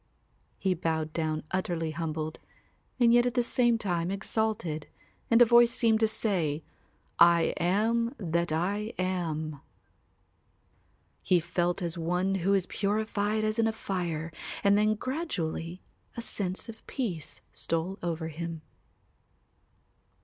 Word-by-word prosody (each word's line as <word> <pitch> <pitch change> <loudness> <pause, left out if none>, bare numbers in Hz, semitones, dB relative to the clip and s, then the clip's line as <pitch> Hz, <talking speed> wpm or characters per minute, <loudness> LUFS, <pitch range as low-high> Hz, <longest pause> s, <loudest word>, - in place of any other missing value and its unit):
He 190 -2 +1
bowed 160 -2 -2
down 155 -2 -1
utterly 170 -4 -1
humbled 155 -1 -3 0.6
and 235 -1 +6
yet 240 0 +5
at 245 - -2
the 245 - +3
same 240 -1 +3
time 175 -5 -1
exalted 195 -5 -1 0.4
and 230 +1 +7
a - - +5
voice 235 +1 +6
seemed 225 -3 +3
to 220 - +4
say, 170 -9 0 0.6
"I 170 -1 +6
am 225 +7 +1
that 170 -3 -1
I 200 +7 -1
am." 160 -5 -2 1.6
He 180 - +3
felt 175 +2 -1
as 170 0 -2
one 180 +3 0
who 195 +3 +3
is 190 -2 +1
purified 210 +1 0
as 215 +1 0
in 225 - +4
a - - +2
fire 170 -7 -3 0.3
and 200 0 +5
then 215 +1 +3
gradually 185 - -3 0.3
a - - -2
sense 190 -4 -3
of 225 -1 -11
peace 190 - -4
stole 165 +4 -2
over 165 -1 -2
him. 165 0 -6
185 Hz, 130 wpm, -29 LUFS, 165-220 Hz, 1.6 s, and